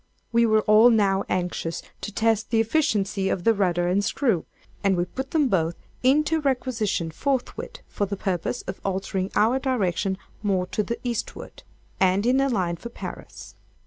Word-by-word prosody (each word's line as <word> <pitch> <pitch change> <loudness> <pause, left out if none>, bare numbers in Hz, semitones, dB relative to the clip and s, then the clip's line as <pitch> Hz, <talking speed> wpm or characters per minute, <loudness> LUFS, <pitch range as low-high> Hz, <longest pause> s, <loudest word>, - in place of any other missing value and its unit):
We 235 0 +4
were 215 -1 +4
all 215 +3 +6
now 200 -4 +2
anxious 175 -2 -2 0.2
to 210 - -5
test 225 +1 +1
the 230 - +2
efficiency 210 -6 +1
of 175 - -1
the 225 - +5
rudder 175 -4 +1
and 190 +3 +2
screw, 225 - 0 0.4
and 195 -2 +3
we 175 - +1
put 265 +9 -6
them 305 -4 +2
both 170 -6 +1 0.3
into 305 +5 +3
requisition 245 - -1
forthwith, 260 - -3
for 205 - -2
the 200 0 -4
purpose 190 +5 -2
of 190 - -7
altering 190 0 -2
our 235 +5 +3
direction 195 -8 0 0.2
more 195 -3 +1
to 210 - -2
the 235 +3 -3
eastward, 235 -2 -5 0.4
and 190 +2 +3
in 260 +2 +3
a 275 - +2
line 180 -7 0
for 235 - -8
Paris. - - -9
210 Hz, 170 wpm, -25 LUFS, 185-240 Hz, 0.4 s, all